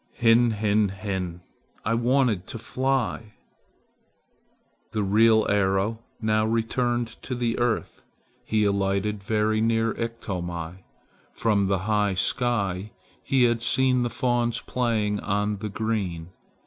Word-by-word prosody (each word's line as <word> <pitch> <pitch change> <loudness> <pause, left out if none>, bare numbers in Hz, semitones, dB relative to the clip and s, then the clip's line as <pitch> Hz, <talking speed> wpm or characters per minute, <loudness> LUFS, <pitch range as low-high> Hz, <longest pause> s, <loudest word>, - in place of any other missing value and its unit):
"Hin 120 0 +4
hin 105 -1 +2
hin! 95 -3 -4 0.4
I 110 - +1
wanted 120 -5 +1
to - - -6
fly!" 120 -3 -2 1.6
The 105 - 0
real 110 +2 +4
arrow 100 +2 +1 0.2
now 110 -1 +1
returned 115 +1 -1
to 130 - -4
the 120 -1 -1
earth. 120 -1 -1 0.4
He 110 -1 +1
alighted 100 +1 0
very 110 +1 +1
near 115 0 +1
Iktomi. 90 -6 -5 0.5
From 105 -4 +1
the 95 -1 +1
high 105 -2 +1
sky 100 -2 0 0.3
he 135 -2 +2
had 120 -1 +2
seen 125 +2 +3
the 120 - 0
fawns 120 -1 0
playing 110 -4 0
on 105 0 -1
the 105 +1 -5
green. 100 -6 -3
110 Hz, 120 wpm, -25 LUFS, 100-115 Hz, 1.6 s, Hin